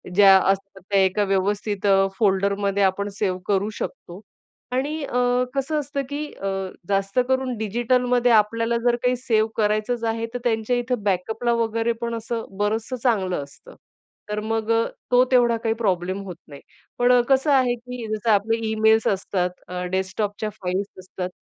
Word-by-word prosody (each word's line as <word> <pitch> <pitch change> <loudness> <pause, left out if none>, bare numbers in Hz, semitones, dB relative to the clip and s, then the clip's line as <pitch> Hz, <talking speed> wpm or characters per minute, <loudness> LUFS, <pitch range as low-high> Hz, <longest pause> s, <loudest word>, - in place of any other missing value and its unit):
ज्या 195 -1 +8 0.2
असतात 195 -1 -2
त्या 200 - +4
एका 190 +2 +1
व्यवस्थित 200 +1 -1
अ, 195 0 +4
फोल्डरमध्ये 200 -1 +1
आपण 200 +2 +1
सेव्ह 185 -3 0
करू 200 0 +1
शकतो. 185 -7 -6 0.5
आणि 285 +4 -2
अ, 250 -1 +1
कसं 300 +3 0
असतं, 280 0 -3
की 290 +1 -3
अ, 195 - -5 0.4
जास्त 195 +3 +1
करून 260 -2 0
डिजिटलमध्ये 245 +3 +1
आपल्याला 230 +2 +3
जर 240 - +4
काही 250 0 +3
सेव्ह 225 -3 +1
करायचंच 215 +3 0
आहे, 230 0 -3
तर 245 - -3
त्यांच्या 225 0 0
इथं 245 -2 -2
बॅकअपला 220 +5 0
वगैरे 230 +1 0
पण 235 0 -2
असं 230 0 -4
बरंचसं 220 +4 -1
चांगलं 190 - +1
असतं. 455 - -15 0.5
तर 210 - -2
मग 225 0 -2
अ, 230 0 +3 0.3
तो 250 0 +6
तेवढा 240 -2 +4
काही 225 -1 +1
प्रॉब्लेम 190 -3 -1
होत 180 -3 -7
नाही. 140 -2 -12 0.4
पण 245 0 +5
कसं 270 +2 +3
आहे, 255 -3 +4
की 245 -1 -8
जसं 220 +2 -3
आपले 215 +3 +2
ईमेल्स 220 0 +3
असतात, 190 -2 0 0.2
अ, 180 0 -4
डेस्कटॉपच्या 205 +3 -2
फाइल्स 190 +2 -1
असतात, 185 0 -6
220 Hz, 160 wpm, -23 LUFS, 195-245 Hz, 0.5 s, ज्या